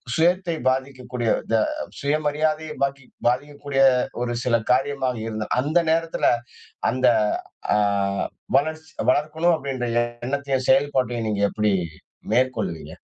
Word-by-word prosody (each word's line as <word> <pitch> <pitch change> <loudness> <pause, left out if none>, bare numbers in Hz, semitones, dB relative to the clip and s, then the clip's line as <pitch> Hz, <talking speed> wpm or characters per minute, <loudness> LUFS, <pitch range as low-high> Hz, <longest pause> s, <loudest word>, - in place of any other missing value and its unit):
சுயத்தை 175 +1 +2
பாதிக்கக்கூடிய, 130 -3 -2 0.2
த - - +4 0.4
சுயமரியாதைய 155 +1 0
பாகி 135 0 -1 0.2
பாதிக்கக்கூடிய 140 +2 0 0.4
ஒரு 120 -1 -2
சில 120 -2 +3
காரியமா 135 +1 +1 0.2
இருந்த 110 -1 -4
அந்த 155 +6 +2
நேரத்துல, 165 0 +1 0.6
அந்த 130 +1 +1 0.7
அ, - - +3 0.8
வளர்ச்சி 160 +1 -1 0.2
வளர்க்கணும் 155 +5 +2
அப்டின்ற 135 -4 -3 0.4
எண்ணத்தையும் 135 -1 -1
செயல்பாட்டையும், 130 -4 +2
நீங்க 105 -1 -1
எப்டி 105 -2 +1 0.6
மேற்கொள்வீங்க? 125 -10 0
135 Hz, 100 wpm, -23 LUFS, 125-155 Hz, 0.8 s, த